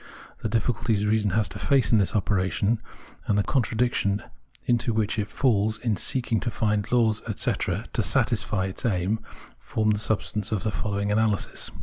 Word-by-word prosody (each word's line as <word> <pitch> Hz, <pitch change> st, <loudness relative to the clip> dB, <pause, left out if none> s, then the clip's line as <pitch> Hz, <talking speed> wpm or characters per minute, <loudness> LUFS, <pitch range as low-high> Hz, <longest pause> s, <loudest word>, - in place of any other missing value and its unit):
The 110 Hz, -, -2 dB
difficulties 115 Hz, -1 st, 0 dB
reason 105 Hz, -1 st, +2 dB
has 110 Hz, -, +2 dB
to -, -, -7 dB
face 135 Hz, -6 st, +3 dB
in 110 Hz, -, +5 dB
this 100 Hz, -, 0 dB
operation, 100 Hz, +2 st, +1 dB, 0.5 s
and 105 Hz, -, +2 dB
the 100 Hz, -, +3 dB
contradictions 115 Hz, -5 st, +1 dB, 0.4 s
into 120 Hz, -1 st, +1 dB
which 110 Hz, 0 st, 0 dB
it 105 Hz, -, -1 dB
falls 110 Hz, -4 st, +1 dB
in 115 Hz, -2 st, -1 dB
seeking 120 Hz, +3 st, 0 dB
to 120 Hz, -, -2 dB
find 105 Hz, -2 st, -1 dB
laws, 115 Hz, -3 st, +3 dB
etc., 105 Hz, -, -1 dB
to -, -, +1 dB
satisfy 95 Hz, -3 st, +1 dB
its 95 Hz, +4 st, -6 dB
aim, 100 Hz, -1 st, 0 dB, 0.4 s
form 110 Hz, -1 st, 0 dB
the 105 Hz, -, 0 dB
substance 105 Hz, 0 st, -1 dB
of 105 Hz, -1 st, -1 dB
the 110 Hz, -, 0 dB
following 100 Hz, 0 st, -2 dB
analysis. 110 Hz, -1 st, +1 dB
110 Hz, 165 wpm, -26 LUFS, 100-115 Hz, 0.5 s, in